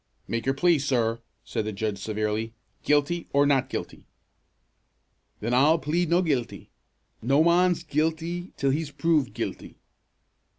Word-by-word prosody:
"Make 115 +2 -3
your 135 - +2
plea, 170 +2 +3
sir!" 120 -4 0 0.2
said - - -3
the 110 - -2
judge 105 0 -3
severely. 110 +2 -2 0.3
"Guilty, 150 +4 +1
or 140 +1 +4
not 140 -3 +2
guilty?" - - -6 1.3
"Then 115 +3 -1
I'll 145 +6 +5
plead 160 +3 -1
no' 175 +2 +3
guilty. 135 -8 -2 0.5
No 135 +6 +3
mon's 175 0 +3
guilty 165 +3 -2
till 135 -1 +1
he's 155 +2 -2
proved 150 -2 +1
guilty." - - -5
145 Hz, 135 wpm, -26 LUFS, 115-165 Hz, 1.3 s, I'll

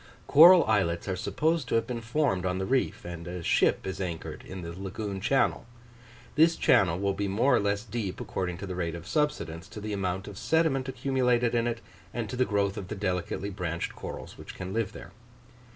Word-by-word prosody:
Coral 170 +4 +9
islets 95 -6 +1
are 95 - -1
supposed 155 - 0
to - - 0
have 115 0 +2
been 120 -1 -4
formed 115 - 0
on 90 0 -1
the 95 - -2
reef; 130 -4 0
and 85 -1 -7
a 90 -1 -5
ship - - +2
is 95 0 -4
anchored 85 -3 -5
in 95 -1 -7
the 85 - -5
lagoon 95 +2 -5
channel. 135 +2 +1 0.7
This 160 +2 +5
channel 90 -4 +4
will 100 +1 0
be 100 +1 -2
more 115 +8 +3
or - - +3
less 100 +1 0
deep, 110 -4 -4
according 90 -2 -3
to 100 - -6
the 95 - -5
rate 85 -2 -2
of 85 0 -8
subsidence, 95 - -1
to 105 +1 -9
the 105 0 -4
amount 95 -1 -2
of 100 -1 -8
sediment 150 -5 +1
accumulated 125 -2 +1
in 120 0 +2
it, 115 -1 -3 0.3
and 115 -2 -2
to - - -4
the 130 0 +2
growth 100 -2 0
of 95 - -5
the - - -5
delicately 95 +1 -2
branched 85 -3 -3
corals - - -8
which - - -9
can 90 +1 -6
live 110 -2 -1
there. 85 - -10
100 Hz, 210 wpm, -28 LUFS, 90-125 Hz, 0.7 s, Coral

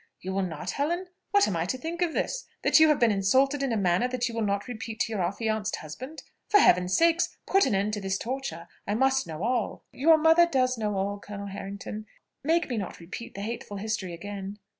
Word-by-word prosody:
You 190 +1 -5
will 195 - +1
not, 165 -5 -3
Helen? 340 +6 -1 0.2
What 405 -1 +4
am 190 - -1
I 165 0 0
to 260 - -1
think 330 +6 -5
of 340 -3 +1
this? - - -2 0.2
that - - +6
you 315 - +7
have 300 -2 +3
been 235 -2 +4
insulted 260 +9 +2
in 270 -2 0
a 225 - +1
manner 185 +4 +2
that 250 0 -1
you 235 - -5
will 230 - -2
not 200 0 -1
repeat 225 -2 -6
to - - 0
your 210 -4 -1
affianced 210 +3 -1
husband? 260 - -8 0.3
For 410 - +6
Heaven's 180 - +4
sake, 335 +1 +4 0.2
put 390 -6 +4
an 230 - +1
end 200 +2 0
to 205 - -2
this 190 0 -1
torture; 235 -10 -5 0.2
I 205 - 0
must 265 +2 +2
know 160 +2 -5
all." 240 -1 -1
"Your 320 +4 +5
mother 325 +2 +6
does 255 -5 +2
know 210 -3 -2
all, 200 +1 -1
Colonel 200 0 -7
Harrington; 200 +2 -7 0.4
make 330 +4 +2
me 245 - -3
not 195 -4 -5
repeat 185 +7 -8
the 200 - -5
hateful 210 -1 -5
history 210 -3 -3
again." 200 +2 -6
220 Hz, 225 wpm, -27 LUFS, 195-270 Hz, 0.4 s, you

